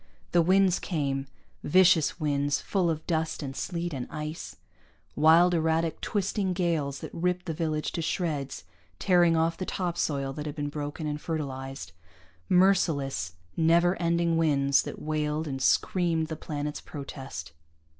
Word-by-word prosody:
The 175 - +5
winds 185 +1 +4
came, 140 -5 -2 0.4
vicious 180 -1 +4
winds 145 -2 +1
full 185 -4 0
of 155 -1 -3
dust 160 -1 -1
and 135 -1 -5
sleet 175 0 -3
and 130 -3 -4
ice, 155 +1 -6 0.6
wild 165 +4 +6
erratic 160 0 0
twisting 200 -2 -1
gales 160 -6 -1
that - - -7
ripped 180 +1 -1
the 165 - -2
village 155 -1 -2
to 170 - -3
shreds, 155 - -2 0.3
tearing 175 -3 +4
off 165 +1 +1
the 185 - -3
topsoil 150 -7 -1
that 150 +2 -5
had 150 - -5
been 145 -1 -3
broken 145 +2 -5
and 150 0 -3
fertilized 135 -4 -5 0.6
merciless, 150 - +2 0.2
never 170 +2 +4
ending 170 0 +2
winds 140 -4 +3
that - - -7
wailed 155 0 -2
and 135 -2 -4
screamed 165 +3 +2
the 160 - -3
planet's 150 -1 -4
protest. 135 - -8
160 Hz, 145 wpm, -28 LUFS, 145-170 Hz, 0.6 s, wild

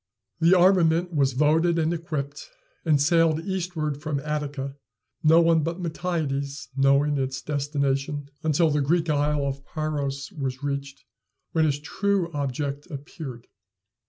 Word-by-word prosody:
The 170 +3 +5
armament 175 -1 +4
was 140 -3 +2
voted 160 +5 +3
and 160 +1 +1
equipped, 150 -4 -5 0.3
and 155 -3 +3
sailed 160 +1 +3
eastward 170 -6 -2
from 155 -3 -2
Attica, 145 -2 -3 0.5
no 160 +2 +6
one 165 -1 +4
but 165 +4 -3
Miltiades 155 -6 -3
knowing 140 +1 +3
its 130 -1 -2
destination 140 0 -1
until 160 +1 +2
the 145 0 +1
Greek 165 +3 +1
isle 145 0 +1
of 140 0 -3
paros 140 -3 -3
was 135 -2 -4
reached, 140 -1 -4 0.5
when 160 -1 +2
his 145 -2 +1
true 190 +4 -1
object 140 0 -3
appeared. 140 -4 -8
150 Hz, 130 wpm, -25 LUFS, 140-165 Hz, 0.5 s, no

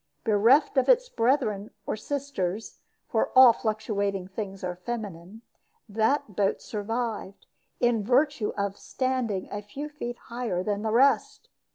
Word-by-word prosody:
Bereft 230 +8 +4
of 265 - +3
its - - +4
brethren, 225 - +1 0.2
or - - -2
sisters 220 -6 -4 0.3
for - - 0
all 255 -2 +9
fluctuating 205 -4 -2
things 195 -1 -6
are 180 -1 -3
feminine 205 0 -7 0.4
that 220 +1 0
boat 195 0 +1
survived, 220 -1 -4 0.3
in 240 -3 +2
virtue 245 -1 +2
of 200 -1 -2
standing 255 -7 -2
a 205 - -4
few 275 +9 -7
feet 240 -5 -6
higher 235 -7 -3
than 205 +1 -1
the 220 - -1
rest. 265 +5 +2
220 Hz, 135 wpm, -27 LUFS, 200-250 Hz, 0.4 s, all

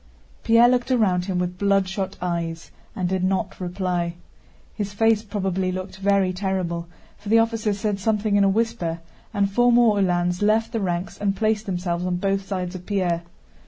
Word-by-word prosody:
Pierre 230 +1 +6
looked 250 +1 +1
around 195 -8 +2
him 185 -2 -2
with 180 0 -2
bloodshot 195 -1 0
eyes 170 -2 -3 0.2
and 185 -2 -1
did 185 0 -1
not 190 +1 -1
reply. 180 -1 -2 0.6
His 205 -2 -4
face 225 0 +3
probably 190 -3 -2
looked 185 +1 -6
very 195 -1 +2
terrible, 180 -3 -2 0.3
for 205 - -8
the 225 - +5
officer 225 -1 +1
said 200 0 -2
something 210 0 +1
in 200 - +4
a 195 - +4
whisper 200 -6 -1 0.3
and 200 -3 +1
four 245 +4 +4
more 235 -4 +4
Uhlans 180 -1 +1
left 220 +2 +2
the 230 - -1
ranks 180 -1 -3
and 200 -1 0
placed 215 0 0
themselves 175 -2 -2
on 180 0 -1
both 195 +1 -1
sides 185 -2 -3
of 185 -1 -7
Pierre. 180 -4 0
195 Hz, 175 wpm, -23 LUFS, 180-215 Hz, 0.6 s, Pierre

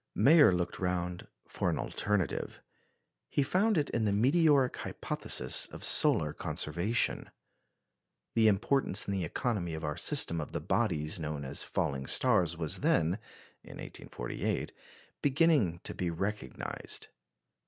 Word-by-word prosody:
Mayer 150 - +6
looked 90 -1 -2
round 90 -1 -3 0.2
for - - -2
an - - -1
alternative. 105 -8 -2 0.7
He 145 - +1
found 195 +8 +1
it 145 -2 0
in 115 -2 0
the 105 - +1
"meteoric 135 +4 +3
hypothesis" - - +1
of - - -11
solar - - +4
conservation. 90 +10 -1 1.0
The 115 -1 +4
importance 110 +1 +1
in 100 - -1
the 95 -2 -2
economy 85 -2 -2
of 80 - -7
our 75 -1 -3
system 85 -1 +2
of 75 - -8
the - - -2
bodies 75 +3 -1
known 75 -3 -4
as 65 +1 -2
falling 65 -1 -2
stars 90 -10 +2
was 80 -3 -1
then 85 +5 +1 0.4
(in - - -12
1848) - - -5 0.5
beginning 140 - +2
to - - -4
be 90 - -2
recognised. 95 - -5
95 Hz, 130 wpm, -31 LUFS, 80-125 Hz, 1.0 s, Mayer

